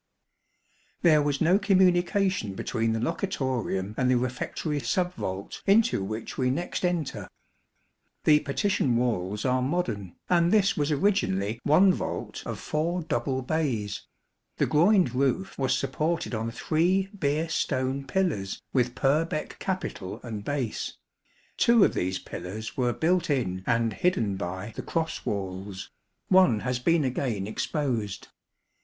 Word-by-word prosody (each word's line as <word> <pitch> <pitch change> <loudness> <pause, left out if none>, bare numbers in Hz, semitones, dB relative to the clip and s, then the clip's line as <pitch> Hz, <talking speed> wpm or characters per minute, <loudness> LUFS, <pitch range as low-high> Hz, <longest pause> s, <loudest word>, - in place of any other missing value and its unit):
There 155 -4 +6
was 145 -1 -1
no 175 +4 +4
communication 185 - +2
between 115 +1 -1
the 115 - -1
locutorium 120 - -2
and 130 -1 +2
the 130 - +4
refectory 130 +4 -2
sub 180 +5 0
vault 95 - -5
into 210 - +4
which 110 +6 -5
we 130 -1 +2
next 170 +9 -2
enter. 175 -5 -1 1.0
The 150 -1 +6
partition 155 - 0
walls 105 -4 -1
are 130 0 +2
modern, 130 - -2
and 170 -1 +3
this 200 -2 +4
was 145 -1 0
originally 115 - +1
one 185 +6 +5
vault - - -4
of - - -4
four 170 +3 -1
double 135 -4 -1
bays. 125 -9 -2 0.5
The - - +2
groined 175 - +4
roof 140 +9 0
was 130 -1 +2
supported 155 +4 -1
on 110 0 -2
three 175 +10 +1
Beer 150 +2 +1
stone 135 -3 -1
pillars 150 - -1
with 125 -2 +1
Purbeck 155 +3 0
capital 115 - -4
and 110 -4 -5
base. 135 -3 -3 0.6
Two 235 -3 +5
of - - 0
these 95 +1 -1
pillars 100 +5 -7
were 125 -2 +1
built 170 +6 +1
in 95 -10 -1
and 115 -2 +2
hidden 115 - +1
by 95 +3 -5
the - - -4
cross 165 -1 -3
walls; 95 -1 -4 0.4
one 185 - +5
has 125 -1 -1
been 165 +4 +2
again 125 -6 -1
exposed. 115 - -2
135 Hz, 135 wpm, -27 LUFS, 110-170 Hz, 1.0 s, There